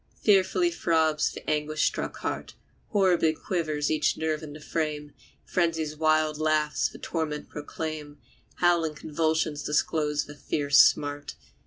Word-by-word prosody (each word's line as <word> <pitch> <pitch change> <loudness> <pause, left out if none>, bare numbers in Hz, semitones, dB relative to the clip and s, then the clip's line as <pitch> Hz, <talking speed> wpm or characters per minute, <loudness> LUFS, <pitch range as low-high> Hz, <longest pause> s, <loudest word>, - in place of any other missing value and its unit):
Fearfully 190 -3 +3
throbs 160 -2 +1
the - - -11
anguish 155 0 0
struck - - -2
heart, - - -4 0.3
Horribly 180 -6 +3
quivers 155 -4 -2
each 155 -1 +1
nerve 160 -1 -1
in 150 -2 -8
the 150 - -10
frame; 150 -2 -3 0.3
Frenzy's 165 -3 0
wild 155 -1 +2
laughs 155 -1 +1
the - - -12
torment 155 -3 -4
proclaim, 150 0 -6 0.4
Howling 170 -3 +2
convulsions 155 0 -1
disclose 150 0 0
the 145 - -10
fierce 145 -1 +1
smart. 145 0 +3
155 Hz, 130 wpm, -27 LUFS, 150-165 Hz, 0.4 s, Fearfully